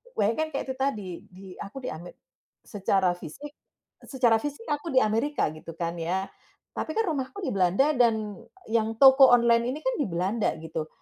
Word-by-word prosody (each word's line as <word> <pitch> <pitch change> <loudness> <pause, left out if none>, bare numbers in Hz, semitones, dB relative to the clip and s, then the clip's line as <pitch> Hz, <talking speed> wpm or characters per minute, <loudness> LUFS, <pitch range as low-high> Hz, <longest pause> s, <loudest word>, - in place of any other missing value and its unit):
Bayangkan 310 +10 0
kayak 270 - -3
itu - - -6
tadi, 215 -9 -1 0.2
di 190 0 -13
aku 235 +7 -8
Ame 175 +2 -8 0.5
secara 195 -2 +1
fisik 180 - -9 0.6
secara 240 -5 +2
fisik 290 - -6
aku 295 +3 -2
di - - +8
Amerika, 225 - 0
gitu 155 +1 -10
kan 170 0 -3
ya. 185 +4 -2 0.5
Tapi 315 - -4
kan 450 - +2
rumahku 305 +8 -4
di - - -1
Belanda, 195 - +2
dan 220 -3 +2 0.4
yang 225 -1 +1
toko 270 0 +8
online 235 0 +4
ini 305 - -6
kan - - 0
di 285 - 0
Belanda, 190 +6 -1
gitu. 160 -1 -5
225 Hz, 170 wpm, -26 LUFS, 185-275 Hz, 0.6 s, di